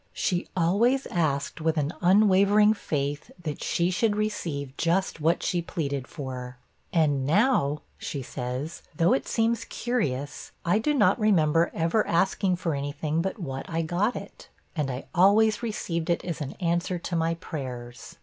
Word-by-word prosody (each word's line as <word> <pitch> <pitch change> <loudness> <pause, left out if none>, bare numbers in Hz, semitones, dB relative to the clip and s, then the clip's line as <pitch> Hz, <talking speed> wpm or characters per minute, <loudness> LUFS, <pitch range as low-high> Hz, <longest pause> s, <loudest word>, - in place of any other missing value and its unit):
She 180 -2 -1
always 225 +11 +3
asked 155 -3 -1
with 160 0 +1
an 150 +2 0
unwavering 200 +2 +5
faith 145 -7 -3
that 150 -3 -4
she 175 +1 +1
should 205 +3 +1
receive 165 -10 -3
just 170 -1 0
what 165 +3 +2
she 175 - 0
pleaded 140 -6 -3
for, 125 -2 -6 0.3
'And 150 -7 +2
now,' 150 - +2 0.2
she 140 -3 -4
says, 130 +5 -5
'though 170 +8 +4
it 265 - -1
seems 230 0 +1
curious, 145 - -3
I 180 +5 +3
do 295 +7 +1
not 235 -1 +4
remember 170 -6 +3
ever 170 +6 +1
asking 185 +1 +2
for 170 -2 -2
any 140 0 -2
thing 155 +2 -1
but 190 +5 -3
what 135 -8 -5
I 165 0 -1
got 175 +8 0
it. - - -9 0.3
And 150 -4 -1
I 130 +1 -5
always 210 +4 +4
received 175 -8 -3
it 170 - 0
as 170 -3 -4
an 135 - -4
answer 175 0 -1
to 175 +1 -4
my 165 0 +1
prayers. 125 -8 -7
170 Hz, 160 wpm, -27 LUFS, 145-195 Hz, 0.3 s, unwavering